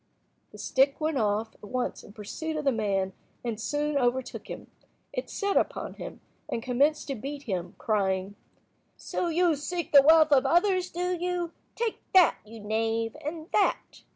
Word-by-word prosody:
The - - -12
stick 270 +1 +2
went 310 -3 0
off 215 +1 0
at - - -27
once 250 +4 -3
in - - -13
pursuit 280 +9 -5
of 300 - -3
the 275 - +4
man 195 -4 0 0.3
and 225 -2 -3
soon 295 +3 0
overtook 250 0 -1
him. - - -7 0.5
It - - -4
set 400 -1 -1
upon - - 0
him, - - -9 0.3
and 230 - -3
commenced 280 +5 +2
to 275 - -1
beat 275 +5 -6
him, 185 -7 -4
crying— 195 -2 0 0.6
"So 355 - -2
you 340 0 +3
seek 340 +4 -4
the 280 - +9
wealth 315 +1 +6
of 270 -2 +6
others, 365 +3 +3
do 360 +1 -2
you? 350 -1 -2 0.2
Take 460 -2 -2
that, 365 -2 +7
you 220 +1 -11
knave, 225 +2 -1
and 315 +2 -5
that." 410 - 0
275 Hz, 170 wpm, -28 LUFS, 225-330 Hz, 0.6 s, the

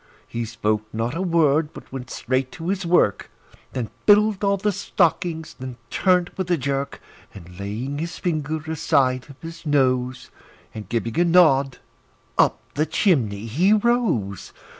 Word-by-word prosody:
He 115 0 -3
spoke 110 -1 -2
not 115 +3 -2
a 165 - -3
word, 160 -4 +2
but - - -12
went 130 -1 -7
straight 130 0 -1
to 165 +1 -5
his 195 -2 -1
work, 170 - +2 0.4
And 120 -4 -4 0.2
filled 210 -1 +5
all 200 0 +2
the 210 +2 0
stockings; 170 -3 -1
then 130 -1 -7
turned 180 -2 +2
with 185 -2 -3
a 175 - +3
jerk, 140 0 -2 0.4
And 90 -1 -12
laying 115 +8 -4
his 170 +2 -4
finger 155 -4 -1
aside 130 -5 +1
of 140 - -13
his 165 +1 -8
nose, 130 -4 0 0.4
And 105 -4 -8
giving 115 +3 -1
a - - +5
nod, 155 -7 +4 0.6
up - - +3
the 155 +2 0
chimney 130 - +1
he 170 - +3
rose. 215 - 0
145 Hz, 155 wpm, -23 LUFS, 120-175 Hz, 0.6 s, filled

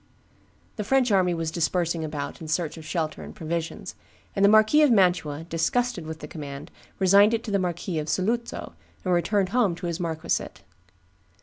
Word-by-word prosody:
The 210 - -2
French 255 +2 +2
army 185 -3 +3
was 165 -1 -2
dispersing 170 0 0
about 150 -1 -5
in 160 - -7
search 155 0 -1
of 160 - -10
shelter 160 -1 -3
and - - -10
provisions; 165 +1 -4 0.4
and 195 - +1
the 200 - +7
Marquis 215 +8 +6
of 300 - +6
Mantua, 180 -8 +2
disgusted 175 +3 -1
with 160 0 -7
the - - -7
command, 140 -3 -8 0.3
resigned 200 +4 +5
it 230 - -4
to 215 - -5
the 200 - +2
Marquis 175 -2 -2
of 155 0 -4
Saluzzo, 235 +5 -2 0.3
and 180 - +2
returned 190 +2 +1
home 215 -6 +2
to 180 - -7
his 170 0 -3
marquisate. 160 -2 -3
175 Hz, 180 wpm, -25 LUFS, 160-205 Hz, 0.4 s, the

